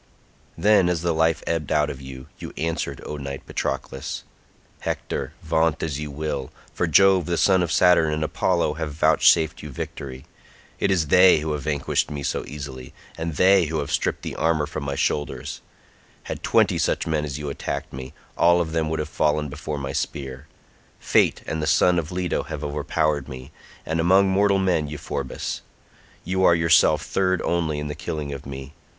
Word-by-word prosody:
Then, 100 0 +4
as 85 -2 -1
the 85 -1 +1
life 80 0 +1
ebbed 80 -4 -2
out 75 -1 +2
of 70 - -9
you, 65 -1 -9
you - - -8
answered, 80 0 -2
O 75 - -5
knight 70 -1 -6
Patroclus: 65 -1 -4 0.6
"Hector, - - -3
vaunt 80 -1 +1
as 75 -3 -2
you 75 0 -4
will, 70 -2 -4 0.2
for - - 0
Jove 95 -3 +5
the 85 -1 0
son 95 0 +4
of 85 -1 -1
Saturn 90 -3 +4
and 75 0 -1
Apollo 85 0 +1
have 80 -2 -2
vouchsafed 80 +1 +3
you 75 - -7
victory; 65 0 -7 0.5
it - - +1
is 85 -6 +1
they 90 -3 +6
who 80 0 -2
have 75 -1 -2
vanquished 70 -1 0
me 70 -1 -5
so - - -1
easily, 70 -3 -8 0.2
and 80 -1 -4
they 95 +1 +5
who 80 +1 -2
have 70 -2 -3
stripped - - -1
the - - -5
armour 80 -2 +1
from 75 0 -6
my 70 0 -2
shoulders; 75 +1 -2 0.6
had - - -6
twenty - - +3
such - - 0
men 80 -2 0
as 70 -2 -4
you 75 -1 -4
attacked - - -5
me, 65 0 -7 0.2
all 85 +1 +4
of 85 -2 -1
them 80 -1 0
would 80 - -1
have 75 - -2
fallen 75 -1 0
before 75 +2 -5
my 70 -1 -4
spear. 65 +1 -4 0.5
Fate - - +2
and 80 - -3
the 75 - -1
son 90 +3 +4
of 80 0 -5
Leto 90 -1 -1
have 75 0 -6
overpowered 75 -1 -1
me, 65 -1 -9 0.3
and 80 +1 -1
among 95 +4 +5
mortal 100 +1 +3
men 90 -5 +1
Euphorbus; 70 -2 -4 0.6
you 95 +2 0
are 85 - +6
yourself 85 0 +4
third 95 -1 +1
only 80 -3 0
in 75 0 -3
the 75 - -4
killing 75 -1 -4
of 70 0 -8
me. 70 +1 -8
75 Hz, 185 wpm, -24 LUFS, 70-85 Hz, 0.6 s, they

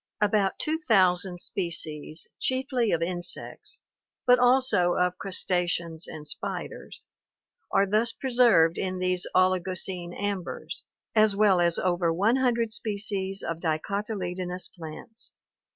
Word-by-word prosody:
About 205 -2 +2
two 315 +1 -1
thousand 185 - +3
species, 160 -4 -2
chiefly 260 -3 0
of 165 -1 +1
insects, 175 - -4 0.4
but 250 0 +6
also 245 -8 +4
of 180 0 0
crustaceans 175 -3 -1
and 150 -1 -8
spiders, - - -5 0.7
are 200 - +4
thus 215 +4 +3
preserved 235 -11 +3
in 185 -1 -2
these 180 -1 0
Oligocene 185 -1 0
ambers, 200 -3 -4 0.3
as 215 -2 +4
well 200 -3 +4
as 170 -1 +3
over 175 -2 +1
one 205 +9 +2
hundred 235 -4 +1
species 200 -3 -2
of 165 -1 -3
dicotyledonous 180 +1 -2
plants. 175 +7 -8
185 Hz, 115 wpm, -27 LUFS, 175-220 Hz, 0.7 s, but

